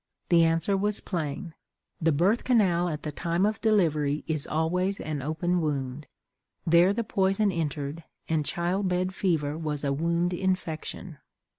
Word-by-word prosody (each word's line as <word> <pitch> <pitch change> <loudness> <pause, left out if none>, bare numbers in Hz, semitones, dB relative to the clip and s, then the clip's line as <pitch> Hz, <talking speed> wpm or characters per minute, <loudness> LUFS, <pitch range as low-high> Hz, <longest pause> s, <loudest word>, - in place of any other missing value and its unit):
The 170 -1 +6
answer 165 +4 +2
was 205 +1 +1
plain. 165 -1 -4 0.5
The 165 0 +3
birth 185 +10 +2
canal 185 -8 +3
at 150 -2 -5
the 150 - -3
time 170 +4 0
of 215 +1 -1
delivery 155 -9 +2
is 155 -3 -2
always 180 +5 0
an 150 -2 -3
open 175 +5 0
wound. 140 -2 -3 0.6
There 170 +3 +5
the 230 +3 -1
poison 195 0 +1
entered, 150 -2 -3 0.2
and 160 -2 +1
child 175 +5 -1
bed 185 +1 0
fever 155 -7 0
was 150 -3 -3
a 140 -1 +1
wound 170 +4 0
infection! 180 -3 -3
170 Hz, 150 wpm, -27 LUFS, 155-185 Hz, 0.6 s, The